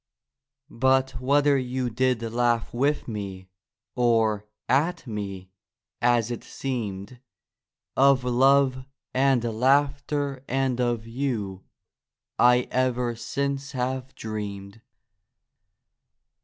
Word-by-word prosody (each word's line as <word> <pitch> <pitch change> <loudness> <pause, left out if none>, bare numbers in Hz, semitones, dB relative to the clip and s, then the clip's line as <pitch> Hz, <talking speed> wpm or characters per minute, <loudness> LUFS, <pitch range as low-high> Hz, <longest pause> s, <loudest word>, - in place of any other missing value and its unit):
But 130 +2 +2
whether 140 +1 +3
you 125 -1 -2
did 125 0 +1
laugh 120 0 0
with 140 +5 0
me, 100 -4 -6 0.4
Or 110 -4 +2 0.2
at 165 +6 +1
me, 100 -5 -6 0.5
as 120 -1 +2
it 120 - -5
seemed— 115 -3 -5 0.8
Of 135 -1 +5
love 130 +1 +3 0.3
and 130 -2 +3
laughter 140 +3 +1
and 130 -1 0
of 120 -2 0
you 115 -6 -3 0.7
I 125 0 +6
ever 125 -2 0
since 140 +3 -3
have 130 +1 -3
dreamed. 105 -1 -6
125 Hz, 90 wpm, -25 LUFS, 115-135 Hz, 0.8 s, I